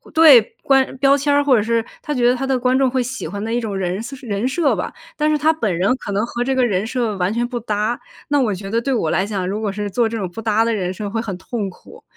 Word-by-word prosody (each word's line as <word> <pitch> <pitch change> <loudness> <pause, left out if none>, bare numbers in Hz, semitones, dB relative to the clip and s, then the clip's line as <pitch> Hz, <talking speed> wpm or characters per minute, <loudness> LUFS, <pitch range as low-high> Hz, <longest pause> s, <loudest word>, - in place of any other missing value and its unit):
对， 290 -9 +7
观 270 -1 +2
标 275 +1 +4
签 285 +1 0
儿， 285 0 +4
或 270 -3 +4
者 215 - +3
是 230 +1 0 0.2
他 300 - -6
觉 240 -2 +3
得 250 - +4
他 270 +2 -3
的 265 -1 +2
观 255 +1 +2
众 265 - +3
会 255 0 0
喜 255 -5 -5
欢 200 +5 -5
的 225 - -3
一 240 - +1
种 210 -3 -4
人 185 +1 -2 0.2
人 215 +1 -1
设 290 +2 +1
吧。 - - -3 0.2
但 305 0 +1
是 305 - +2
他 315 +2 +3
本 215 - -1
人 195 +9 +2
可 205 - -6
能 205 +3 0
和 240 0 -3
这 265 +1 0
个 255 - +3
人 200 -2 0
设 235 -4 -1
完 180 +2 0
全 240 +2 -1
不 245 -1 -4
搭， 215 +1 -1 0.3
那 290 -1 +2
我 220 -5 +1
觉 195 +1 -7
得 230 +1 +1
对 275 - -2
我 160 -8 0
来 190 - +1
讲， 195 -4 -2
如 210 +3 -3
果 205 -2 -1
是 205 0 -4
做 230 +1 +1
这 230 - -4
种 195 - -2
不 225 - -7
搭 220 0 +2
的 230 - +1
人 185 -4 -2
设 205 +2 -5
会 225 +2 -2
很 195 -5 -5
痛 205 0 -4
苦。 180 - -15
230 Hz, 315 characters per minute, -20 LUFS, 205-260 Hz, 0.3 s, 对